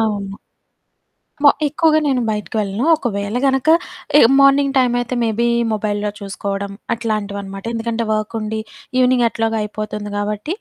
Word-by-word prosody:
అవును. 200 Hz, -3 st, -2 dB, 1.1 s
మొ 285 Hz, -, +9 dB, 0.2 s
ఎక్కువగా 310 Hz, +1 st, +3 dB
నేను 260 Hz, -3 st, +1 dB
బయటకి 210 Hz, +1 st, -4 dB
వెళ్ళను. 205 Hz, +4 st, -2 dB
ఒకవేళ 205 Hz, -5 st, -3 dB
గనక, 270 Hz, +2 st, +1 dB, 0.5 s
ఈ -, -, +8 dB, 0.2 s
మార్నింగ్ 275 Hz, 0 st, +4 dB
టైమయితే 245 Hz, -1 st, +1 dB
మేబీ 230 Hz, +1 st, +1 dB, 0.2 s
మొబైల్‌లో 210 Hz, -1 st, -1 dB
చూసుకోవడం 200 Hz, 0 st, -4 dB, 0.2 s
అట్లాంటివనమాట. 200 Hz, -3 st, -4 dB
ఎందుకంటే, 230 Hz, 0 st, -2 dB
వర్కుండి 215 Hz, 0 st, -2 dB, 0.4 s
ఈవినింగెట్లాగో 235 Hz, -3 st, +2 dB
అయిపోతుంది 210 Hz, 0 st, -5 dB
గాబట్టి, 210 Hz, -, -2 dB
220 Hz, 115 wpm, -19 LUFS, 205-245 Hz, 1.1 s, మొ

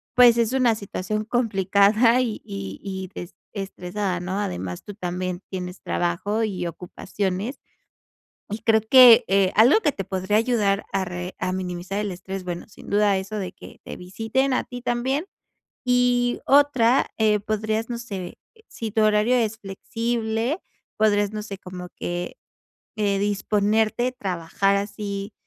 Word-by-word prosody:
pues, 240 Hz, -2 st, +7 dB
es 230 Hz, -1 st, +2 dB
una 250 Hz, -4 st, +3 dB
situación 215 Hz, 0 st, -3 dB
complicada 215 Hz, +1 st, +3 dB
y 230 Hz, -4 st, -3 dB
y 100 Hz, 0 st, -7 dB
y 190 Hz, -2 st, -5 dB
des 175 Hz, +1 st, -8 dB, 0.2 s
estresada, 195 Hz, -1 st, -3 dB
¿no? 185 Hz, +2 st, -3 dB
Además, 90 Hz, -, -4 dB
tú 205 Hz, -, -9 dB
también 180 Hz, -1 st, -3 dB
tienes 180 Hz, -1 st, -6 dB
trabajo 200 Hz, +6 st, -1 dB
y 190 Hz, -5 st, -2 dB
ocupaciones, 190 Hz, -, -4 dB, 0.9 s
y 210 Hz, -, -2 dB
creo 225 Hz, 0 st, +3 dB
que, 240 Hz, +1 st, +8 dB
eh, 195 Hz, -1 st, +3 dB
algo 245 Hz, -, +6 dB
que 300 Hz, -8 st, +1 dB
te 195 Hz, -, -4 dB
podría 190 Hz, +3 st, 0 dB
ayudar 215 Hz, -4 st, +1 dB
a 195 Hz, -, 0 dB
re 180 Hz, 0 st, -6 dB
a 185 Hz, 0 st, -2 dB
minimizar 185 Hz, +1 st, -4 dB
el 210 Hz, -1 st, -2 dB
estrés, 190 Hz, +2 st, -6 dB
bueno, 175 Hz, -1 st, -5 dB
sin -, -, -15 dB
duda 205 Hz, -1 st, +3 dB
eso 195 Hz, +3 st, -5 dB
de 185 Hz, -3 st, -4 dB
que -, -, -14 dB
te -, -, -7 dB
visiten 225 Hz, +9 st, -1 dB
a -, -, 0 dB
ti 245 Hz, -1 st, -8 dB
también. 260 Hz, +7 st, -1 dB, 0.6 s
Y 245 Hz, -1 st, +2 dB
otra, 270 Hz, -3 st, +4 dB
eh, 215 Hz, -1 st, +3 dB
podrías, 215 Hz, +2 st, -2 dB
no 235 Hz, -, -3 dB
sé, 195 Hz, -6 st, -7 dB, 0.3 s
si 225 Hz, -1 st, -5 dB
tu 220 Hz, -, +2 dB
horario 215 Hz, +3 st, +3 dB
es 225 Hz, -2 st, 0 dB
flexible, 230 Hz, -, -2 dB, 0.4 s
podrías, 205 Hz, -1 st, +2 dB
no 215 Hz, 0 st, -4 dB
sé, 200 Hz, -2 st, -7 dB
como 180 Hz, -1 st, -8 dB
que, 175 Hz, 0 st, -4 dB, 0.6 s
eh, 200 Hz, -2 st, +1 dB
disponerte, 210 Hz, +3 st, +1 dB
trabajar 195 Hz, -1 st, -1 dB
así, 200 Hz, 0 st, -4 dB
205 Hz, 150 wpm, -24 LUFS, 190-230 Hz, 0.9 s, que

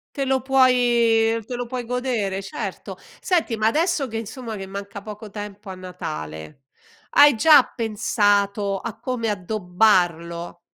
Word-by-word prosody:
Te 275 Hz, -2 st, -1 dB
lo 265 Hz, 0 st, +1 dB
puoi 240 Hz, -4 st, +3 dB
te 245 Hz, -, -5 dB
lo 245 Hz, 0 st, -3 dB
puoi 245 Hz, 0 st, -5 dB
godere, 235 Hz, -6 st, -2 dB
certo. 195 Hz, -, -6 dB, 0.2 s
Senti, 335 Hz, -10 st, 0 dB
ma 215 Hz, 0 st, +1 dB
adesso 310 Hz, +2 st, +1 dB
che 225 Hz, -2 st, -5 dB
insomma, 225 Hz, +1 st, -6 dB
che 195 Hz, -2 st, -6 dB
manca 200 Hz, +1 st, -7 dB
poco 210 Hz, +1 st, -9 dB
tempo 205 Hz, 0 st, -8 dB
a 190 Hz, -, -6 dB
Natale 80 Hz, -, -7 dB, 0.5 s
hai 290 Hz, -2 st, +7 dB
già 300 Hz, +7 st, +7 dB
pensato 205 Hz, -2 st, +1 dB
a 230 Hz, -, -7 dB
come 245 Hz, -3 st, -2 dB
addobbarlo? 180 Hz, -4 st, 0 dB
220 Hz, 140 wpm, -22 LUFS, 195-245 Hz, 0.5 s, hai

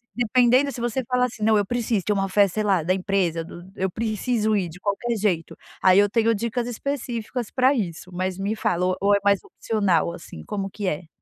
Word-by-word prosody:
dependendo, 250 Hz, +3 st, +3 dB
se 240 Hz, -, -7 dB
você 240 Hz, +2 st, -1 dB
fala 250 Hz, -1 st, +2 dB
assim: 225 Hz, -3 st, -6 dB
"Não, 220 Hz, 0 st, +4 dB
eu 205 Hz, -, +1 dB
preciso. 230 Hz, -2 st, -1 dB
De -, -, 0 dB
uma 195 Hz, -1 st, 0 dB
festa, 195 Hz, -1 st, +2 dB
sei 215 Hz, -, 0 dB
lá, 195 Hz, -4 st, +2 dB
da 180 Hz, +4 st, +2 dB
empresa, 185 Hz, -3 st, 0 dB
do 175 Hz, +1 st, -11 dB
eu 190 Hz, 0 st, -1 dB
preciso 220 Hz, +1 st, 0 dB
ir, 190 Hz, -4 st, 0 dB
de 170 Hz, +3 st, -12 dB
qualquer 210 Hz, +5 st, -1 dB
jeito", 190 Hz, -6 st, -1 dB, 0.3 s
aí 185 Hz, +1 st, +6 dB
eu 205 Hz, 0 st, +4 dB
tenho 230 Hz, +1 st, +2 dB
dicas 235 Hz, +2 st, -2 dB
específicas 245 Hz, -2 st, -4 dB
pra 260 Hz, +1 st, +3 dB
isso. 185 Hz, -, -4 dB
Mas 185 Hz, +1 st, -3 dB
me 200 Hz, +3 st, -2 dB
fala 180 Hz, -4 st, 0 dB
ou 185 Hz, 0 st, +1 dB
ou 200 Hz, +1 st, +3 dB
é -, -, +2 dB
mais 200 Hz, -2 st, +3 dB
opcional, 190 Hz, -7 st, 0 dB
assim, 125 Hz, -, -10 dB
como 195 Hz, -, -4 dB
que 200 Hz, 0 st, -5 dB
é? 165 Hz, 0 st, -3 dB
205 Hz, 220 wpm, -24 LUFS, 185-235 Hz, 0.3 s, aí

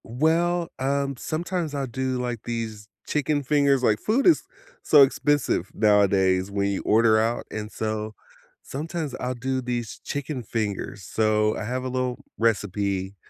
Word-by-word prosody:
Well, 165 Hz, +7 st, +1 dB
um, 140 Hz, +1 st, 0 dB
sometimes 165 Hz, +1 st, -3 dB
I'll 140 Hz, -1 st, -1 dB
do 130 Hz, +1 st, -2 dB
like 120 Hz, -3 st, -3 dB
these 110 Hz, -3 st, -5 dB, 0.2 s
chicken 150 Hz, 0 st, 0 dB
fingers, 140 Hz, -1 st, +3 dB
like, 110 Hz, -3 st, +3 dB
food 235 Hz, +6 st, +1 dB
is 345 Hz, -, +5 dB, 0.4 s
so 150 Hz, -, +7 dB
expensive 135 Hz, -, +1 dB
nowadays, 100 Hz, -3 st, +3 dB
when 100 Hz, 0 st, 0 dB
you 100 Hz, -, -2 dB
order 110 Hz, 0 st, +4 dB
out, 115 Hz, +2 st, 0 dB
and 105 Hz, 0 st, -5 dB
so, 110 Hz, 0 st, -3 dB, 0.5 s
sometimes 155 Hz, 0 st, -4 dB
I'll 125 Hz, 0 st, -2 dB
do 130 Hz, +2 st, -2 dB
these 120 Hz, -2 st, -4 dB
chicken 145 Hz, -2 st, -4 dB
fingers. 105 Hz, -2 st, -3 dB
So, 105 Hz, +2 st, +1 dB
I -, -, -4 dB
have 125 Hz, +3 st, -2 dB
a 130 Hz, -, -3 dB
little 125 Hz, -1 st, -2 dB
recipe 100 Hz, -3 st, 0 dB
120 Hz, 150 wpm, -25 LUFS, 105-140 Hz, 0.5 s, so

